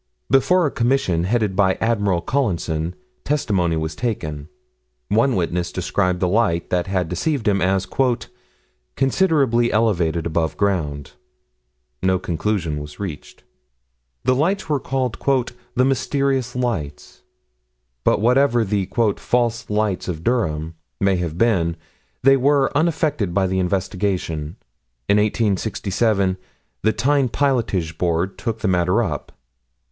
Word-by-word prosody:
Before 175 +7 +4
a 145 - 0
commission, 115 -9 +1
headed 105 -2 0
by 95 -1 +3
Admiral 105 -6 0
Collinson, 85 - -1 0.3
testimony 95 - 0
was 80 +1 -2
taken. 80 -11 -4 0.6
One 115 +6 +3
witness 90 -1 -1
described 90 0 0
the 90 - +2
light 90 -4 +1
that 90 0 0
had 95 -3 0
deceived 115 - -1
him 100 -2 +2
as 95 +1 +1 1.1
"considerably 135 -5 +2
elevated 90 -7 +1
above 80 -1 -1
ground." 75 -9 -1 0.9
No 95 0 +2
conclusion 85 -3 -2
was 75 0 -10
reached: 90 -9 -7 0.8
the 130 - +3
lights 175 +9 0
were 150 -3 +1
called 130 -3 -2 0.6
"the 125 - +3
mysterious 135 -1 0
lights." 80 - -3 0.8
But - - +3
whatever 120 +1 +3
the 100 -2 -1 0.3
"false 120 -1 0
lights 105 -2 0
of 85 -3 -4
Durham" 80 -10 0 0.3
may 95 -1 +2
have 85 -2 -3
been, 90 -7 +2 0.5
they 135 +1 +6
were 140 +1 +2
unaffected 150 - 0
by 100 -1 +3
the 95 0 0
investigation. 90 -4 -2 0.5
In 100 - +4
1867, 105 -2 +1 0.4
the 110 - +3
Tyne 140 +1 +1
Pilotage 110 - 0
Board 90 +2 0
took 115 -1 -3
the - - 0
matter 90 +4 +2
up. 75 -8 -4
100 Hz, 120 wpm, -21 LUFS, 85-125 Hz, 1.1 s, they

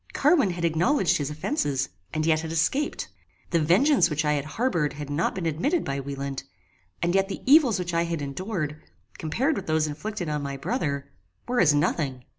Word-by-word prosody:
Carwin 290 - +4
had 175 -1 -2
acknowledged 175 - +2
his 145 -1 -2
offences, 150 - -1 0.2
and 155 0 -1
yet 160 -1 +3
had 160 0 -5
escaped. 265 - 0 0.4
The 170 - +3
vengeance 190 - +4
which 150 0 -1
I 150 - +3
had 145 -1 -1
harboured 170 - 0
had 145 -1 -7
not 150 +4 0
been 185 -3 -3
admitted 175 - 0
by 140 0 -2
Wieland, 140 0 -4 0.6
and 175 0 +1
yet 195 0 +3
the 195 - -6
evils 270 - +6
which 175 -1 -3
I 170 0 +2
had 170 -1 -2
endured, 155 0 -4 0.4
compared 260 - 0
with 195 - -5
those 155 -1 +2
inflicted 175 +5 -4
on 150 -1 -1
my 140 -1 -4
brother, 140 - -2 0.4
were 245 0 0
as 150 -4 +5
nothing. 140 -3 0
160 Hz, 190 wpm, -26 LUFS, 150-195 Hz, 0.6 s, evils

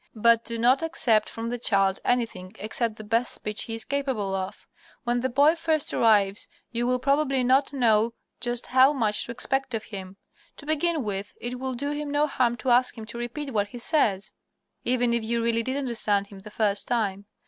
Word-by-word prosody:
But 230 +1 +4
do 230 0 -4
not 245 +5 +3
accept 245 -10 +2
from 230 0 -5
the 245 0 -3
child 195 -4 +2
anything 225 -7 -1
except 220 +1 -2
the 215 - -9
best 230 +3 0
speech 210 0 -3
he 225 - -4
is 225 - -2
capable 265 -9 -2
of. 190 0 -4 0.4
When 240 -1 0
the 260 +2 -1
boy 285 +5 +4
first 325 -3 0
arrives 205 -3 +3 0.2
you 240 0 -1
will, 250 0 +2
probably, 275 0 +1
not 265 +3 +3
know 230 -4 +2 0.2
just 240 -1 -2
how 260 +3 +5
much 215 -6 +1
to - - -6
expect 265 +1 -1
of 220 - -3
him. 190 -2 -8 0.4
To 285 - -10
begin 310 0 +1
with, 205 -1 -4
it 245 +1 -4
will 260 -1 -3
do 285 +4 -2
him 295 0 -4
no 290 +1 +2
harm 250 -5 0
to 250 +2 -1
ask 250 +1 +3
him 220 - -7
to 230 +2 -8
repeat 265 +3 -5
what 205 -2 +1
he 225 - -10
says, 215 - +1 0.5
even 245 -1 +2
if 235 -1 0
you 230 +1 -1
really 230 0 +2
did 260 +4 -2
understand 220 -7 0
him 200 - -11
the 205 +2 -11
first 205 -1 0
time. 205 -4 -1
235 Hz, 205 wpm, -26 LUFS, 215-265 Hz, 0.5 s, how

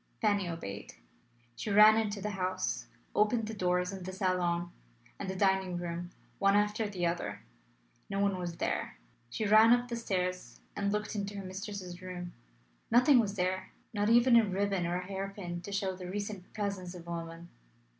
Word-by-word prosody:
Fanny 205 -4 +2
obeyed. 105 -12 -6 0.6
She 215 - -4
ran 210 +2 +8
into 210 -2 -1
the 210 +2 -2
house, 185 -1 -2 0.3
opened 215 +1 +2
the 220 - -4
doors 180 -1 0
of 190 -2 -6
the 185 - -5
salon 180 -2 0 0.5
and 190 - -4
the 190 - -3
dining 190 -2 +2
room 175 0 -4 0.3
one 195 0 +4
after 210 +1 +1
the 180 -3 -2
other: 170 0 -2 0.7
no 195 0 -2
one 200 -2 +1
was 175 -2 -4
there. - - -2 0.3
She 215 - -2
ran 215 +2 +7
up 245 0 +1
the 235 - -2
stairs 185 - -2 0.2
and 200 0 0
looked 210 0 -2
into 200 -1 -3
her 195 - -5
mistress's 185 -2 -6
room: 180 -1 -6 0.6
nothing 250 +3 +6
was 210 -3 0
there, 185 0 -1 0.2
not 205 0 +1
even 240 +1 +6
a 230 - +6
ribbon 195 -2 0
or 175 - -1
a 180 - -5
hair 195 +1 -4
pin, 175 -3 -5
to 200 - -8
show 195 -1 -1
the 180 -1 -7
recent 200 -1 -5
presence 200 -4 -3
of 170 -1 -10
a - - -5
woman. 165 0 -6
195 Hz, 185 wpm, -32 LUFS, 180-210 Hz, 0.7 s, ran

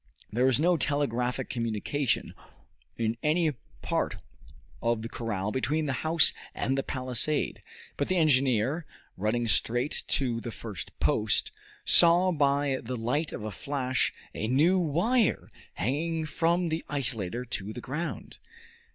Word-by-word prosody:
There 125 +4 +3
was 130 0 +3
no 175 +2 +3
telegraphic 130 -4 0
communication 115 +4 -1 0.6
in 115 0 0
any 155 +1 +2 0.3
part - - 0 0.7
of 115 -1 0
the 115 - -5
corral 105 -4 -3
between 150 +5 0
the 135 - -1
house 160 0 +4 0.2
and 135 - 0
the 135 - +1
palisade; 130 +3 -1 0.4
but 140 - 0
the 185 - +1
engineer, 135 -1 +2 0.3
running 110 +4 0
straight 120 +5 +1
to 120 -4 0
the 120 - -5
first 105 -6 -7
post, - - +2 0.3
saw 175 +2 +6
by 140 -3 +2
the 125 +2 -4
light 125 +8 -1
of - - -6
a 110 - -4
flash 130 0 -1 0.2
a 110 - -2
new 160 +10 +4
wire 180 - +1 0.2
hanging 160 - -1
from 165 +3 +1
the 160 +1 -2
isolator 125 -5 -2
to 100 +2 -3
the 115 - -6
ground. 150 +8 -5
135 Hz, 135 wpm, -28 LUFS, 115-155 Hz, 0.7 s, saw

